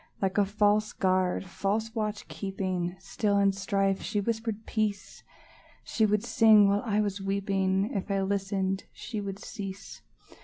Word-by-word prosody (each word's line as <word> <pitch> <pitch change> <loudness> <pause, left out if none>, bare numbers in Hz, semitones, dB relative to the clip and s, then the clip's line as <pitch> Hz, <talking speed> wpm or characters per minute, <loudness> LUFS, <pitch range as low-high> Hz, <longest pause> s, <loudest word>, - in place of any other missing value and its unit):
Like 195 +1 0
a 205 - +4
false 210 +1 +2
guard, 185 0 +1
false 210 +5 -2
watch 215 -2 -3
keeping, 185 -3 -3
Still, 200 +2 -1
in 200 0 +4
strife, 195 0 0
she 210 - -1
whispered 225 0 -2
peace; 210 -3 -2 0.6
She 220 -2 +1
would 210 +1 +1
sing 220 -3 +6
while 200 +1 +2
I 210 -3 0
was 200 -1 -1
weeping; 195 +1 0
If 195 -1 -3
I 195 -1 +1
listened, 195 -1 -1
she 215 -3 -5
would 195 -1 -5
cease. 200 -1 -8
200 Hz, 150 wpm, -28 LUFS, 195-210 Hz, 0.6 s, sing